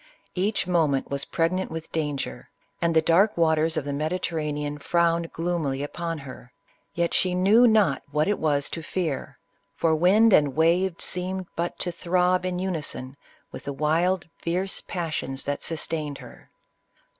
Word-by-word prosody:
Each 200 +3 0
moment 160 -8 +1
was 140 0 -2
pregnant 180 +3 0
with 160 0 -7
danger, 145 - -3 0.3
and 170 -1 +1
the 160 - +5
dark 190 +6 +4
waters 160 -1 +2
of 145 - -1
the 145 - -3
Mediterranean 150 -2 -2
frowned 170 +1 +1
gloomily 160 -5 -2
upon 165 +2 -4
her; 130 -3 -11 0.4
yet 170 0 0
she 180 -1 +2
knew 210 +7 +5
not 210 - +3
what 150 +2 +1
it 205 - 0
was 145 -3 +1
to 165 - -4
fear, 160 -3 -3 0.4
for 165 -1 +2
wind 195 +7 +5
and 145 -5 +4
wave 170 +3 +3
seemed 185 +1 -3
but 170 +1 -2
to 175 - -2
throb 180 +1 +1
in 180 -1 -2
unison 155 -8 -3 0.4
with - - -9
the 140 - -3
wild, 165 +5 +1
fierce 185 +3 -1
passions 155 -6 -4
that 145 0 -3
sustained 155 -3 -2
her. - - -14
165 Hz, 155 wpm, -25 LUFS, 150-180 Hz, 0.4 s, the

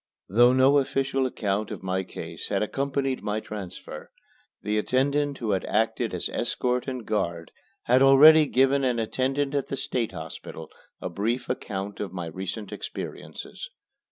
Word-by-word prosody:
Though 120 +5 +5
no 130 +2 +5
official 135 -1 0
account 105 -3 -2
of - - -7
my 95 0 0
case - - -7
had 100 0 +1
accompanied 135 +2 -1
my 105 +1 -1
transfer, 105 -4 -8 0.5
the 105 0 +1
attendant 140 +4 +1
who 110 -3 -2
had 95 - 0
acted 110 +1 0
as - - -2
escort 125 +1 -1
and 130 -4 -4
guard 85 -6 -2 0.3
had 125 +2 +4
already 150 +3 +8
given 135 +2 +3
an 125 -2 +1
attendant 135 +5 -1
at 140 -2 0
the 135 - -3
State 125 -3 -2
Hospital - - -8 0.3
a - - -3
brief 115 +8 -2
account 100 -5 -4
of 100 -3 -4
my 90 -2 -4
recent 95 +5 -5
experiences. - - -7
125 Hz, 155 wpm, -26 LUFS, 105-135 Hz, 0.5 s, already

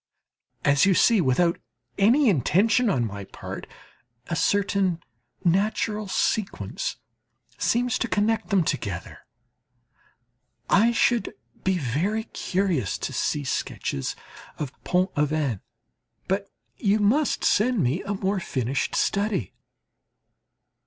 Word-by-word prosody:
As 145 +6 +4
you 190 - +4
see, 225 0 +5
without 170 +5 +2 0.4
any 245 +8 +5
intention 210 - +3
on 125 -11 +1
my 100 -2 -6
part, 95 - -8 0.6
a 170 - -3
certain 195 -2 +1 0.4
natural 210 +3 +1
sequence 190 - -1 0.6
seems 245 0 +1
to 235 - 0
connect 220 +1 0
them 195 -4 +3
together. 100 - -4 1.5
I 225 +4 +5
should 235 0 +1 0.3
be 190 -1 +1
very 170 - -1
curious 180 - -1
to - - -4
see 150 - -1
sketches 70 - -3 0.4
of 145 -4 -4
Pont 180 +1 +1
Aven; 150 -7 0 0.7
but 195 +1 -1 0.3
you 205 -1 +2
must 240 +8 +2
send 225 -3 +3
me 135 +9 0
a 205 +1 -3
more 195 +1 -1
finished 130 -5 -2
study. 200 - 0
190 Hz, 110 wpm, -25 LUFS, 145-215 Hz, 1.5 s, see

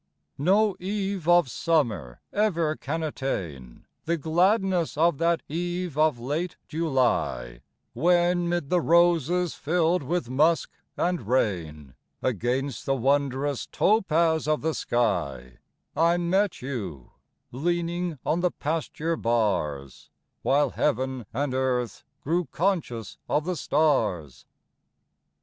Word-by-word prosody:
No 195 +6 +3
eve 195 -2 -2
of 175 -3 +6
summer 115 - -1
ever 170 -7 +1
can 160 +4 -4
attain 85 - -5 0.2
The 170 +1 0
gladness 180 +2 +1
of 165 -2 +3
that 170 0 +1
eve 175 0 -3
of 155 -3 +3
late 150 +9 -3
July, 125 - 0 0.3
When 175 +4 +2
'mid 175 -5 -2
the 180 -1 +3
roses, 170 0 +3
filled 170 +3 +1
with 165 0 -2
musk 155 +6 +2 0.3
and 175 - -1
rain, 80 - -1 0.3
Against 130 +2 -1
the 135 - +2
wondrous 140 +1 0
topaz 165 -7 +2
of 155 0 +1
the 160 +1 0
sky, 85 - -1 0.4
I 170 +2 +3
met 185 0 0
you, 95 - -5 0.4
leaning 175 +3 -1
on 165 - +1
the 180 0 +2
pasture 160 +1 -2
bars, 90 - -1 0.3
While 145 +2 +2
heaven 130 -4 -1
and 135 +2 -2
earth 130 -2 -1 0.2
grew 170 +4 0
conscious 150 - -2
of 150 - +1
the 180 0 -1
stars. 110 - 0
155 Hz, 115 wpm, -26 LUFS, 125-175 Hz, 0.4 s, of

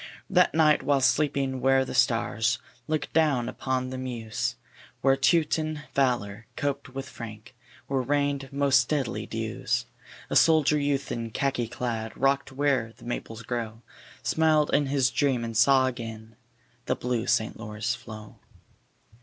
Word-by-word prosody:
That 180 -4 +4
night 155 -2 +4
while 140 -1 +2
sleeping 135 -1 +1
where 135 0 +3
the - - -6
stars 120 -1 +2 0.3
Look 155 -1 -2
down 145 -7 +2
upon 130 0 -2
the 130 - -5
Meuse, 115 -4 -3 0.5
Where 135 0 +4
Teuton 155 +1 +1
valor 115 -5 0
coped 140 -1 -2
with 135 +1 -6
Frank, 115 0 -9 0.3
Where 135 -1 0
rained 140 0 -1
most 140 -3 +3
deadly 140 -6 -1
dews, - - -2 0.5
A - - 0
soldier 155 -2 +5
youth 140 -1 -1
in 115 -1 -3
khaki 125 0 -1
clad, 115 -2 -4
Rock'd 135 +1 +1
where 135 -4 0
the - - -14
Maples 115 -1 -5
grow, 115 -1 -4 0.4
Smiled 155 -2 +2
in 145 -1 +3
his 135 -2 +2
dream 130 -4 +1
and 115 -1 -6
saw 130 +3 +5
again 115 -3 -6 0.5
The - - +1
blue 125 -2 -2
St. 110 0 +1
Lawrence 105 0 -3
flow. 110 -1 -10
130 Hz, 145 wpm, -27 LUFS, 115-140 Hz, 0.5 s, soldier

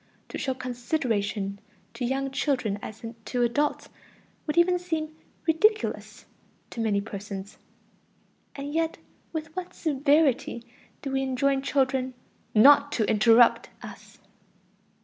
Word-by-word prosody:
To - - -5
show 265 -2 -1
"consideration" 235 -6 -2 0.3
to 235 +2 -5
young 270 +2 -1
children 250 -8 -1
as 215 +1 -9 0.2
to 245 -1 0
adults 290 +5 0 0.6
would 300 - -2
even 355 +1 +4
seem 315 -3 -3 0.3
ridiculous 425 +7 +1 0.5
to 230 - -4
many 210 -3 +1
persons. 200 -1 -7 1.0
And 285 +1 -6
yet 325 0 0 0.3
with 315 -1 -6
what 370 -1 -6
severity 285 -4 +1 0.4
do 275 - -3
we 270 0 0
enjoin 270 +1 +1
children 260 -2 0 0.4
"not 285 +5 +7
to 220 - +1
interrupt" 230 +2 +5
us! - - -11
270 Hz, 115 wpm, -26 LUFS, 230-305 Hz, 1.0 s, not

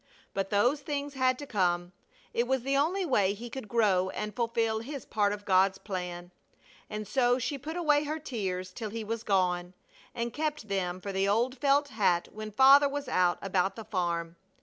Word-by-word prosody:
But 195 0 -2
those 245 +8 +2
things 285 0 -3
had 255 -1 +2
to 290 - -7
come. 175 -6 0 0.4
It 235 +1 +1
was 265 -1 0
the 275 +1 0
only 350 +7 +1
way 205 - +2
he 235 +3 -8
could 265 -4 -6
grow 195 -5 +2
and 210 +2 -5
fulfil 230 -2 0
his 275 +3 -7
part 205 -1 +1
of 205 0 -6
God's 190 0 +3
plan. 180 -3 -6 0.6
And 210 -1 -5
so 245 -2 +3
she 260 +3 -3
put 315 +6 -5
away 300 -3 +3
her 305 +2 -2
tears 190 -11 -4
till 215 +3 -5
he 225 +1 -5
was 225 +1 -3
gone, 180 -3 0 0.4
and 235 -1 -3
kept 300 -7 -3
them 185 -2 -1
for 200 - -4
the 195 +1 +1
old 235 +6 +1
felt 285 +1 +3
hat 195 -7 +1
when 215 0 -7
Father 270 +6 +7
was 285 0 -4
out 180 -1 +2
about 195 0 0
the 225 - -8
farm. 170 -4 -2
220 Hz, 195 wpm, -29 LUFS, 190-265 Hz, 0.6 s, Father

